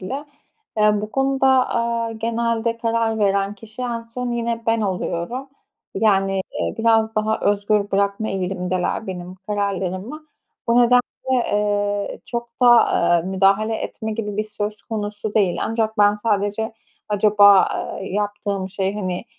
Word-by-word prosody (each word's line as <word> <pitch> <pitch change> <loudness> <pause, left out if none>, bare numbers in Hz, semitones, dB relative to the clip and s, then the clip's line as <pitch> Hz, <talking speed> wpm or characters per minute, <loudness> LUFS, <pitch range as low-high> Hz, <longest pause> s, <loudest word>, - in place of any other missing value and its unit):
bile. 265 +10 -5 0.5
Eee, 210 0 +5
bu 210 - -5
konuda, 270 +1 +1 0.2
aaa, 230 -1 -1
genelde 230 0 -1
karar 230 -1 0
veren 200 -1 +1
kişi 220 +3 -10
en 240 -2 -2
son 250 -1 -3
yine 235 -1 -2
ben 225 0 +2
oluyorum, 195 +5 -3 0.5
yani, 195 -2 +2 0.2
eee, - - -1
biraz 225 -1 +3
daha 215 +1 0
özgür 205 0 +1
bırakma 200 +2 0
eğilimindeler 185 +1 -2
benim 180 -1 -6
kararlarımı. 200 - -3 0.4
Bu 235 - +4
nedenle, 245 0 +6 0.3
eee, 205 -4 0
çok 235 -1 -4
da, - - +6
aaa, 225 -7 +5
müdahale 195 +4 +2
etme 220 0 -5
gibi 210 -2 -4
bir 215 - 0
söz 210 -1 -5
konusu 210 -1 -4
değil. 195 -5 +2
Ancak 225 -1 -1
ben 205 0 +5
sadece 210 +1 -1 0.4
acaba, 205 -1 +5 0.3
eee, 195 - -5
yaptığım 205 -1 -2
şey, 195 0 -2
hani, 185 -2 -3
210 Hz, 135 wpm, -21 LUFS, 200-230 Hz, 0.5 s, nedenle